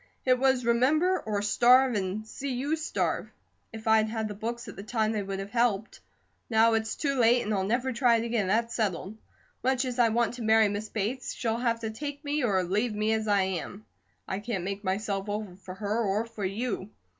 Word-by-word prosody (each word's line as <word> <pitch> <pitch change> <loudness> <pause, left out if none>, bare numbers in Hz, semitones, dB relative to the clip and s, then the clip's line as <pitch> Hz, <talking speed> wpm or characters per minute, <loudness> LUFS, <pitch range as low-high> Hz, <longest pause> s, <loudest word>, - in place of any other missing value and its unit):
It 255 -1 +4
was 265 -2 +2
remember, 300 +11 +3
or 205 -2 -2
starve, 250 +5 +5
and 205 +1 -2
see 275 +5 -5
you 280 +5 0
starve. 315 0 -2 0.4
If 225 -1 -9
I'd 220 0 +4
had 220 -1 -2
the 210 - -5
books 235 +3 -5
at - - -8
the - - -7
time 220 0 0
they 215 -2 -1
would 195 0 -4
have 195 +1 -6
helped; 230 -3 0 0.5
now 225 0 +4
it's 220 0 0
too 280 -2 -1
late, 240 +1 +4
and 215 - -2
I'll 195 -2 +1
never 245 +6 0
try 235 -1 +4
it 230 0 0
again, 230 -4 0
that's 230 +4 +1
settled. 205 -2 -2 0.5
Much 260 +1 +1
as 250 -1 -4
I 235 -1 +5
want 235 0 +1
to 245 - -8
marry 220 -1 +4
Miss 205 +1 -4
Bates, 225 +5 -3
she'll 230 -2 -1
have 235 -2 0
to 220 -1 -3
take 285 +5 -6
me 290 0 0
or 195 -6 +2
leave 210 +5 0
me 215 +1 +1
as 220 0 -1
I 200 -2 +3
am. 190 +2 -4 0.4
I 190 - -2
can't 205 -4 -3
make 200 +2 -4
myself 195 +1 -2
over 205 -3 -4
for 185 0 -10
her 210 +3 -1
or 205 +2 0
for 225 -4 -5
you. 205 0 -3
220 Hz, 215 wpm, -28 LUFS, 205-245 Hz, 0.5 s, starve